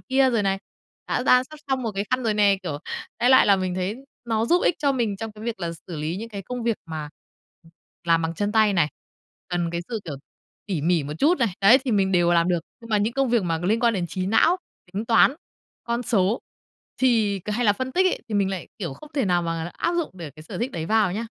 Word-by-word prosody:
kia 265 -1 +2
rồi 230 -4 +1
này, 195 0 0 0.5
đã - - 0
đan 250 0 +5
sắp 310 +4 -13
xong 265 -1 0
một 225 -3 -2
cái 195 +1 -2
khăn 255 0 +1
rồi 220 -2 +1
nè. 200 -2 +4
Kiểu, 150 -5 -4 0.4
đại 245 - +4
loại 260 - +7
là 200 - +5
mình 185 -1 -2
thấy 185 +4 -2 0.3
nó 225 0 +1
giúp 350 +7 +3
ích - - +3
cho 280 -2 +2
mình 225 -6 -1
trong 225 +1 -6
cái 215 +1 -11
việc 230 -4 -4
là 170 -1 -2 0.2
xử 170 - -5
lý 155 +4 -3
những 225 +3 -6
cái 200 -3 -7
công 250 +5 -5
việc 230 -2 0
mà 155 -2 -5 1.0
làm 165 -1 +3
bằng 165 0 -2
chân 205 +3 -1
tay 215 -1 +4
này, 170 -6 +2 0.6
cần 175 -2 -1
cái 170 - -2
sự, 225 -3 -3
kiểu, 145 -5 -5 0.5
tỉ 175 -8 -2
mỉ 170 -1 +2
một 145 +1 -5
chút 315 +3 +3
này, 235 -3 +2
đấy, 225 +7 +7
thì 260 - -1
mình 195 -2 +2
đều 175 -1 +3
làm 170 +1 +3
được. 175 -2 +1 0.2
Nhưng 230 -1 -12
mà 210 - +3
những 215 +3 0
công 270 +1 +1
việc 235 -4 +3
mà 165 -2 0
liên 200 +7 0
quan 235 -2 +3
đến 180 -3 -1
trí 185 +1 -3
não, 320 - +4 0.4
tính 205 +4 -3
toán, 230 +4 +5 0.5
con 235 +1 -1
số 210 -2 +1 0.6
thì 220 -6 +2
hay 215 +4 -1
là 205 - +6
phân 260 +5 -4
tích 370 +4 +3
ấy 370 - 0
thì 215 - -4
mình 200 -1 +2
lại, 190 -3 -5
kiểu, 170 -10 -4
không 305 - -14
thể 275 -4 +1
nào 175 -2 +2
mà 165 0 -3
áp 340 - 0
dụng 340 -3 -1
để 170 -5 -8
cái 155 - -11
sở - - -7
thích 250 +3 -2
đấy 160 -1 -4
vào 215 -3 +2
nha. 220 +5 -3
205 Hz, 260 wpm, -24 LUFS, 175-235 Hz, 1.0 s, loại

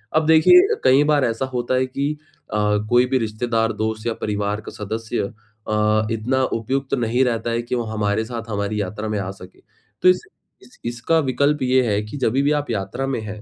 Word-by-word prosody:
अब 155 0 +3
देखिए 360 - +6
कई 135 +3 +5
बार 145 -3 +3
ऐसा 115 +3 -1
होता 125 +1 0
है 130 0 +2
कि 140 +3 -2 0.4
अ, - - -1 0.3
कोई 120 +1 +5
भी 130 +1 +1
रिश्तेदार, 115 0 -1
दोस्त 110 0 -3
या 115 - 0
परिवार 105 0 -2
का - - -9
सदस्य 110 +3 -4 0.5
अ, 105 0 +2
इतना 125 +4 0 0.2
उपयुक्त 135 +4 -3
नहीं 120 0 +2
रहता 115 -1 -1
है 115 0 0
कि 120 +1 -3
वो 120 - -1
हमारे 105 0 0
साथ 115 -1 -6
हमारी 105 0 -2
यात्रा 105 +3 -4
में 105 -1 -1
आ 95 -1 -3
सके। 95 -1 -14 0.4
तो - - +6
इस 180 - +3 0.4
इस 250 - -19
इसका 120 +7 +1
विकल्प 140 +1 +1
ये 130 0 +3
है 105 0 +1
कि 110 +7 -7
जभी 130 0 +1
भी 145 - +2
आप 145 - -14
यात्रा 100 +5 -3
में 135 -3 -1
हैं 105 0 -7
115 Hz, 205 wpm, -21 LUFS, 110-130 Hz, 0.5 s, देखिए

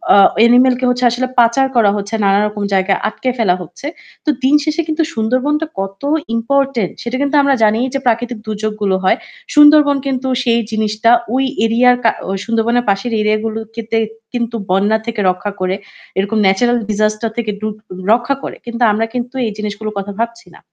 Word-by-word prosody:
আ - - +6 0.2
animal 245 +2 +5
কে 255 - 0 0.3
আসলে 255 +2 -1
পাচার 240 +3 +4
করা 210 -4 +4
হচ্ছে, 205 +2 -5
নানারকম 205 +1 +1
জায়গায় 190 0 +2
আটকে 255 +4 -3
ফেলা 190 -6 +2
হচ্ছে। 175 - -11 0.4
তো - - 0
দিন 275 +3 +4
শেষে 310 +1 0
কিন্তু 315 +1 0
সুন্দরবনটা 255 +8 0
কত 195 +3 -5 0.3
ইম্পোর্টেন্ট। 260 -3 0
সেটা 240 +2 -3
কিন্তু 285 +1 0
আমরা 280 -1 +3
জানিই 220 +4 +2
যে 275 - 0
প্রাকৃতিক 240 0 0
দুর্যোগগুলো 210 -2 -1
হয়। 185 - +3 0.4
সুন্দরবন 295 -1 +6
কিন্তু 265 -1 -2 0.2
সেই 235 -2 +2
জিনিসটা 215 +1 +1 0.2
ওই 265 - +2 0.2
এরিয়া 240 +2 +4
কা 225 - +4 0.3
সুন্দরবনের 235 +1 +1
পাশের 200 +4 0
এরিয়াগুলো 215 +1 0 0.2
তে 225 0 -2 0.4
কিন্তু 235 -1 -2
বন্যা 200 +4 +2
থেকে 230 -2 -3
রক্ষা 190 +3 -2
করে 185 +1 0 0.4
এরকম 200 +3 0
natural 240 +5 +2
disaster 215 +1 0
থেকে 220 -3 -1
ডু 215 - -2 0.5
রক্ষা 245 +4 +1
করে। - - -5
কিন্তু 235 0 -2
আমরা 220 +2 0
কিন্তু 245 +1 -4
এই 220 - -2
জিনিসগুলোর 210 0 -5
কথা 200 +1 -4
ভাবছি 230 -2 -3
না। - - -16
230 Hz, 170 wpm, -16 LUFS, 210-250 Hz, 0.5 s, আ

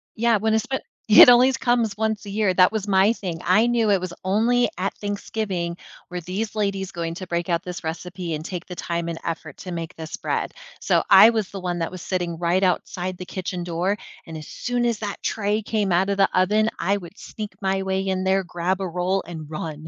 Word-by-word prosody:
Yeah, 230 0 +3
when 220 +2 0
espe 245 +4 0 0.3
It 215 +3 +10
only 245 +2 +7
comes 240 -4 +1
once 220 -1 -1
a 200 - -7
year, 205 -2 +1
that 180 +1 +5
was 210 -2 -2
my 195 +3 +4
thing, 180 -7 -5
I 215 +6 +4
knew 235 -2 +2
it 195 -2 +4
was 185 -1 -4
only 235 +5 +2
at 195 +2 -1
Thanksgiving 200 -4 -3 0.3
were 180 -1 -4
these 205 +6 -4
ladies 195 -2 -1
going 165 -1 -4
to 185 +1 -7
break 170 0 -2
out 170 -1 +1
this 180 -1 -7
recipe 175 +1 -4
and 155 0 -4
take 180 -1 -5
the 180 - -7
time 170 -1 -3
and 165 - -4
effort 160 -3 -5
to 180 - -7
make 165 -2 -5
this 160 0 -7
bread, - - -2 0.3
so - - +2
I 225 - +9
was 220 -4 -1
the 195 -2 -7
one 175 -1 -2
that 165 - -2
was 185 - -8
sitting 175 -3 -2
right 175 +3 +1
outside 180 0 -1
the 180 - -7
kitchen 180 -1 -4
door, 180 +4 -1 0.3
and 160 -1 -7
as 155 - -9
soon 245 -1 -2
as 235 -3 0
that 205 -2 -5
tray 210 0 0
came 210 -3 -1
out 190 +3 +2
of 200 - 0
the 195 - +4
oven, 210 +4 +3
I 195 +4 +1
would 180 +1 -11
sneak 210 -1 -7
my 195 0 0
way 190 0 -1
in 190 -1 -1
there, 190 0 +2
grab 180 +2 -2
a 190 - -1
roll, 180 +3 -1
and 160 -3 -8
run. 155 0 -6
190 Hz, 225 wpm, -23 LUFS, 175-210 Hz, 0.3 s, It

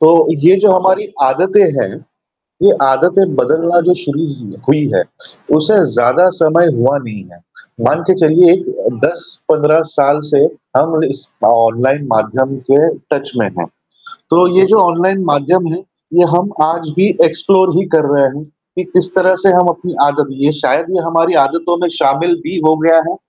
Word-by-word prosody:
तो 155 +1 +5 0.4
ये 190 +2 +6
जो 210 -2 +4
हमारी 190 +2 +1 0.2
आदतें 185 +9 +2 0.2
हैं, 95 - -3 0.7
ये - - +5
आदतें 175 +8 +1
बदलना 170 +2 +1
जो 180 - +4
शुरू 145 +1 -3
ही 125 -9 -10
हुई 150 +2 +2
है, - - +2 0.5
उसे 155 +8 +1 0.2
ज़्यादा 125 +10 +2
समय 165 +2 +3
हुआ 130 +4 0
नहीं 105 -4 -9
है। 85 - -20 0.5
मान 160 +6 0
के - - +4
चलिए 170 +2 +5
एक 420 - -3
10-15 155 - 0 0.2
साल 145 0 +2
से 145 - +2 0.4
हम 160 0 +1
इस 135 - -5 0.2
अ, - - +4
ऑनलाइन 120 +5 +1
माध्यम 130 +5 -1
के 150 +4 +4 0.2
टच - - -4
में - - -1
हैं। - - -4 0.6
तो 175 +2 +4
ये 190 - +5
जो 220 - +4
ऑनलाइन 185 +2 0
माध्यम 165 +4 0
है, - - -4 0.4
ये 175 0 +4
हम 180 +3 0
आज 165 0 -2
भी 195 - +3 0.2
एक्सप्लोर 180 +3 +1
ही 190 - 0
कर 155 -2 +2
रहे 140 -1 +2
हैं 150 - -9 0.3
कि 185 - -3
किस 180 0 -1
तरह 185 0 +2
से 195 - +4
हम 180 0 +3
अपनी 175 +1 -5
आदत 145 0 0
ये 145 +2 +2
शायद 165 - 0
ये 175 - 0
हमारी 165 +1 0
आदतों 170 +4 -3
में 175 - 0
शामिल 165 +6 +1
भी 185 - -6
हो 155 - +3
गया 165 +1 +3
है - - -5
165 Hz, 180 wpm, -13 LUFS, 145-180 Hz, 0.7 s, ये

